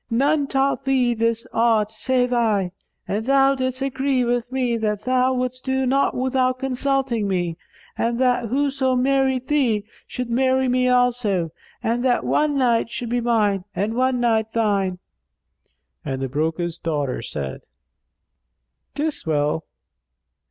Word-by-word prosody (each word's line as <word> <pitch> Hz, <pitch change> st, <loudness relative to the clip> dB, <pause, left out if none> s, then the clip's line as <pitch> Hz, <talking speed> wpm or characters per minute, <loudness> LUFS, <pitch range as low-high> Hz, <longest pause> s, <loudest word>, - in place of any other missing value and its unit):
None 280 Hz, +5 st, +2 dB
taught 275 Hz, 0 st, 0 dB
thee 255 Hz, -3 st, +2 dB
this 230 Hz, +1 st, 0 dB
art 225 Hz, -2 st, +2 dB
save 250 Hz, +2 st, 0 dB
I, 210 Hz, -6 st, +1 dB, 0.4 s
and 210 Hz, +2 st, -1 dB
thou 275 Hz, 0 st, +4 dB
didst 260 Hz, 0 st, -2 dB
agree 270 Hz, -1 st, 0 dB
with 245 Hz, 0 st, -1 dB
me 250 Hz, -2 st, 0 dB
that 210 Hz, -2 st, -2 dB
thou 255 Hz, 0 st, +2 dB
wouldst 255 Hz, 0 st, -3 dB
do 265 Hz, 0 st, 0 dB
naught 275 Hz, +2 st, +2 dB
without 255 Hz, 0 st, +1 dB
consulting 265 Hz, -3 st, -1 dB
me 175 Hz, -3 st, -1 dB, 0.4 s
and 235 Hz, +1 st, 0 dB
that 245 Hz, -2 st, +2 dB
whoso 265 Hz, +1 st, 0 dB
married 265 Hz, 0 st, +1 dB
thee 240 Hz, -9 st, +1 dB, 0.2 s
should 250 Hz, -1 st, -4 dB
marry 260 Hz, +1 st, +2 dB
me 255 Hz, 0 st, +2 dB
also, 245 Hz, -9 st, +1 dB, 0.3 s
and 235 Hz, +2 st, 0 dB
that 250 Hz, -2 st, +2 dB
one 300 Hz, -1 st, +1 dB
night 240 Hz, -4 st, +2 dB
should 235 Hz, 0 st, -5 dB
be 245 Hz, +1 st, 0 dB
mine 210 Hz, -5 st, +1 dB
and 210 Hz, +3 st, -1 dB
one 255 Hz, +1 st, +1 dB
night 225 Hz, -2 st, +1 dB
thine." 200 Hz, -5 st, +1 dB, 1.1 s
And 135 Hz, -1 st, -3 dB
the 135 Hz, -, -2 dB
broker's 160 Hz, +4 st, -2 dB
daughter 145 Hz, -7 st, -2 dB
said, 70 Hz, -, -5 dB, 1.3 s
"'Tis 295 Hz, -, -2 dB
well." 150 Hz, 0 st, 0 dB
245 Hz, 140 wpm, -22 LUFS, 215-260 Hz, 1.3 s, thou